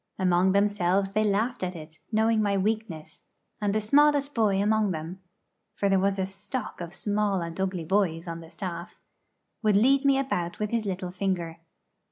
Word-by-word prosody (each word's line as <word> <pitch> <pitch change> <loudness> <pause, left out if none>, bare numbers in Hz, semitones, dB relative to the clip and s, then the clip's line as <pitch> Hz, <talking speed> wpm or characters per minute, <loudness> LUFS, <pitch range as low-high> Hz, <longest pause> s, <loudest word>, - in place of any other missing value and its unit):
Among 185 0 +3
themselves 195 -1 +2
they 215 +2 +1
laughed 215 +5 0
at 185 -1 -3
it, 160 -1 -11
knowing 220 0 +2
my 200 -1 +1
weakness; 190 -7 -3 0.4
and 205 -1 +1
the 215 - +1
smallest 285 +5 +3
boy 210 -4 +2
among 215 0 +2
them 165 +2 -5 0.6
for 200 - 0
there 195 -1 +3
was 195 +1 +1
a 190 - 0
stock 205 +4 -6
of 170 -1 -6
small 205 -1 0
and 170 +2 -5
ugly 185 -3 -2
boys 175 -2 0
on 165 0 -5
the 165 -1 -12
staff 175 +1 -7 0.6
would 210 -3 +3
lead 265 +6 +4
me 275 -1 +4
about 180 -11 -2
with 210 -1 -3
his 230 -3 -1
little 185 -1 -3
finger. 180 -3 -2
195 Hz, 180 wpm, -27 LUFS, 180-215 Hz, 0.6 s, lead